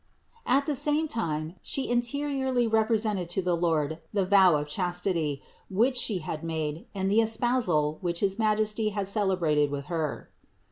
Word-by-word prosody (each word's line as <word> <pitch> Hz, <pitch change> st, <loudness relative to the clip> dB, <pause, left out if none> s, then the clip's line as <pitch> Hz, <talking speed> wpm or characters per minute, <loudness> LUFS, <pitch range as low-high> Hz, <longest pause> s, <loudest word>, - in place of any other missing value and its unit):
At 275 Hz, +3 st, +3 dB
the 300 Hz, -, -1 dB
same 295 Hz, +3 st, +1 dB
time 160 Hz, -, -3 dB
She 270 Hz, -, -1 dB
interiorly 260 Hz, +1 st, 0 dB
represented 220 Hz, -4 st, +1 dB
to 185 Hz, +2 st, -1 dB
the 180 Hz, -1 st, +1 dB
Lord 160 Hz, -2 st, 0 dB
the 200 Hz, -3 st, 0 dB
vow 190 Hz, -3 st, +5 dB
of 145 Hz, 0 st, -2 dB
chastity, 175 Hz, -3 st, -1 dB, 0.3 s
which 235 Hz, +7 st, +2 dB
She 225 Hz, -5 st, +2 dB
had 155 Hz, -1 st, -5 dB
made 160 Hz, -1 st, -3 dB
and 190 Hz, -1 st, -1 dB
the 210 Hz, +3 st, +4 dB
espousal, 220 Hz, -10 st, +1 dB
which 175 Hz, -2 st, -2 dB
his 195 Hz, +1 st, 0 dB
Majesty 215 Hz, 0 st, +1 dB
had 200 Hz, -2 st, -3 dB
celebrated 180 Hz, -8 st, +1 dB
with 140 Hz, 0 st, -5 dB
Her. 160 Hz, -3 st, -3 dB
195 Hz, 155 wpm, -27 LUFS, 160-230 Hz, 0.3 s, vow